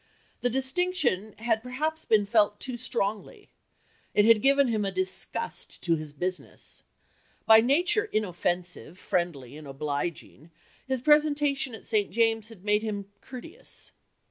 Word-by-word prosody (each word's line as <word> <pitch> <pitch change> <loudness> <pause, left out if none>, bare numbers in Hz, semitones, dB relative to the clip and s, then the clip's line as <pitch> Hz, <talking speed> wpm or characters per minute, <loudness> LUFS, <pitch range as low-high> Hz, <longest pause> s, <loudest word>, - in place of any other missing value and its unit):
The 245 - +1
distinction 265 - 0
had 225 -1 0
perhaps 305 +6 -3
been 215 -2 +3
felt 210 0 +3
too 255 -2 -4
strongly. 240 - -3 0.6
It 205 - +5
had 225 -1 +6
given 275 0 +4
him 215 -2 0
a 195 - 0
disgust 185 0 -4
to 170 -2 +2
his 155 -2 -6
business.... 180 +5 -6 0.6
By 220 0 +8
nature 350 - +2
inoffensive, 180 - -2
friendly, 150 -10 -2
and 155 -2 -10
obliging, 145 +3 -4 0.4
his 260 -2 -1
presentation 290 -3 +3
at 220 - -13
St. 210 -3 +1
James's 225 0 +1
had 205 -4 -14
made 210 0 +3
him 205 -2 -4
courteous." 330 - -8
220 Hz, 135 wpm, -28 LUFS, 185-265 Hz, 0.6 s, By